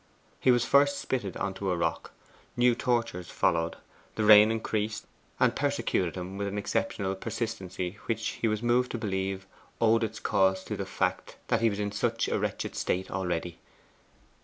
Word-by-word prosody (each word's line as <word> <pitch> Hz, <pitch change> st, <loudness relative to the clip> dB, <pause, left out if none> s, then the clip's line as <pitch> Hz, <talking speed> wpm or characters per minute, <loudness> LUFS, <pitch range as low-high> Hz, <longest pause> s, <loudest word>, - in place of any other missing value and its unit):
He -, -, +2 dB
was 120 Hz, -1 st, +4 dB
first 140 Hz, 0 st, +4 dB
spitted 105 Hz, -8 st, -3 dB
on 95 Hz, -1 st, -2 dB
to 95 Hz, 0 st, -3 dB
a 90 Hz, -, +1 dB
rock. 85 Hz, -1 st, -1 dB, 0.5 s
New 120 Hz, 0 st, +5 dB
tortures 115 Hz, -8 st, -1 dB
followed. 85 Hz, -2 st, +1 dB, 0.4 s
The 110 Hz, -, 0 dB
rain 105 Hz, 0 st, +8 dB
increased, 110 Hz, -1 st, -2 dB, 0.3 s
and -, -, +3 dB
persecuted 90 Hz, -3 st, 0 dB
him 95 Hz, +2 st, -6 dB
with 100 Hz, -, -1 dB
an 100 Hz, +1 st, -4 dB
exceptional 95 Hz, -1 st, -1 dB
persistency 95 Hz, -2 st, -4 dB
which 115 Hz, -1 st, -1 dB
he 115 Hz, -, +3 dB
was 110 Hz, +1 st, -1 dB
moved 125 Hz, +1 st, +2 dB
to -, -, -1 dB
believe 95 Hz, -3 st, -2 dB, 0.3 s
owed 115 Hz, 0 st, +4 dB
its 110 Hz, 0 st, -3 dB
cause 95 Hz, -1 st, +2 dB
to -, -, -4 dB
the -, -, -4 dB
fact -, -, -2 dB
that -, -, +2 dB
he 115 Hz, -, +4 dB
was 100 Hz, -1 st, -4 dB
in 105 Hz, 0 st, -1 dB
such 105 Hz, -, 0 dB
a -, -, 0 dB
wretched -, -, -3 dB
state 95 Hz, +1 st, -1 dB
already. 90 Hz, -2 st, -2 dB
105 Hz, 175 wpm, -29 LUFS, 95-115 Hz, 0.5 s, rain